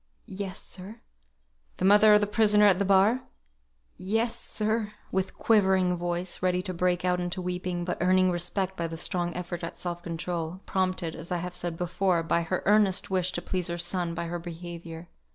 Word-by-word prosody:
"Yes, 195 0 -5
sir." 195 +5 -7 0.8
"The 185 - -1
mother 210 +2 +7
of 210 - +4
the - - +3
prisoner 210 0 +4
at 195 -2 +5
the 200 - +1
bar?" 200 +6 +4 0.8
"Yes, 225 +5 0
sir;" 215 0 -1 0.2
with 190 0 -2
quivering 190 -4 +3
voice, 175 +1 -3
ready 180 0 +1
to 185 - -4
break 180 0 0
out 180 0 +2
into 175 +1 -3
weeping, 180 -1 -3
but 180 - -3
earning 185 +1 +4
respect 180 +2 -2
by 170 -2 -2
the 165 0 -6
strong 175 0 -1
effort 175 -1 -5
at 165 - -5
self 175 -1 -4
control, 170 +1 -4
prompted, 185 -3 -1
as 165 +1 -9
I 180 - +1
have 180 +1 -5
said 175 -2 -4
before, 180 0 0
by 170 +1 +1
her 175 +2 -2
earnest 205 -2 +3
wish 185 -1 +1
to 175 - -3
please 180 -2 -2
her 170 - -3
son 175 0 -2
by 170 0 -3
her 175 +1 -4
behaviour. 170 0 -8
180 Hz, 190 wpm, -27 LUFS, 175-190 Hz, 0.8 s, mother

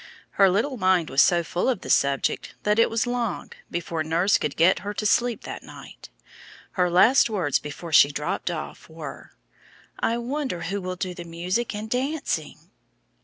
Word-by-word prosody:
Her 195 -1 +4
little 230 +9 0
mind 185 -5 +2
was 135 +1 +5
so 175 -1 +4
full 175 +8 -1
of 240 -7 -1
the - - -8
subject 140 -1 +1
that 210 +1 +2
it 230 - +5
was 225 +1 0
long 245 -5 -3 0.2
before 170 -2 -3
nurse 170 +6 +2
could 145 - -3
get 170 +3 +4
her 205 +1 -6
to 215 - -3
sleep 235 +2 +1
that - - -7
night. - - -13 0.6
Her 180 -4 +1
last 230 +9 +5
words 180 -10 0
before 155 +3 -8
she 145 0 +7
dropped 150 +4 -3
off 165 -1 -7
were, 160 -3 -9 0.7
"I 230 - 0
wonder 255 - -3
who 195 +4 -3
will 185 0 -4
do 180 0 -4
the 175 - -8
music 180 +7 -3
and 210 +1 -5
dancing!" 275 +6 -3
185 Hz, 175 wpm, -24 LUFS, 170-230 Hz, 0.7 s, she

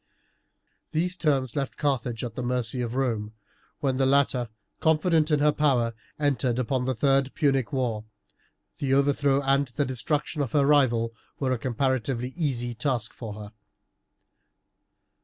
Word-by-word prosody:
These 175 +3 0
terms 135 -8 0
left 140 -2 -2
Carthage 125 -5 -1
at 120 -2 -4
the 125 - -5
mercy 125 0 -1
of 120 0 -3
Rome, 115 -5 -1 0.5
when 135 -2 +1
the 135 0 +3
latter, 135 -3 +2 0.3
confident 160 0 +3
in 150 -2 +2
her 150 0 +5
power, 130 -6 +2 0.2
entered 130 -5 +1
upon 125 0 0
the 130 0 0
third 135 +2 +2
Punic 135 -5 +1
war, 120 -6 -1 0.7
the 135 -1 +1
overthrow 140 0 +2
and 135 +1 +2
the 130 +4 -1
destruction 145 +4 -2
of 135 - -3
her 145 -2 +4
rival 120 -6 +3 0.3
were 130 -2 0
a 125 - 0
comparatively 130 0 -1
easy 125 -8 -1
task 120 -3 -1
for 110 -4 -7
her. 105 0 -9
130 Hz, 145 wpm, -26 LUFS, 120-145 Hz, 0.7 s, her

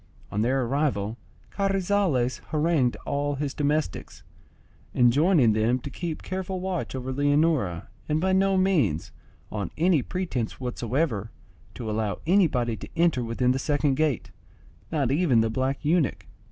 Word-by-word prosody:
On 105 - -1
their 130 +3 +1
arrival 120 -5 -1 0.4
Carrizales 195 -9 +1
harangued 155 -5 +1
all 145 0 -1
his 140 0 -3
domestics, 150 - -2 0.7
enjoining 130 - +4
them 110 +3 +2
to 130 +2 -8
keep 165 +2 -5
careful 185 0 -4
watch 185 -6 -3
over 130 0 -4
Leonora, 145 - +1 0.2
and 150 +1 +2
by 190 +3 +1
no 195 0 +3
means, 155 - +1 0.4
on 105 -2 -3
any 165 -2 +3
pretence 150 -9 -3
whatsoever, 125 -2 -2 0.5
to 115 - -6
allow 105 -2 -1
anybody 150 - +2
to - - -9
enter 165 -7 +2
within 120 +2 +1
the 130 - 0
second 145 0 +1
gate, 145 -3 0 0.6
not 140 -6 +1
even 140 -6 +3
the 110 0 0
black 130 +4 -2
eunuch. 160 -2 +1
140 Hz, 140 wpm, -26 LUFS, 120-170 Hz, 0.7 s, enjoining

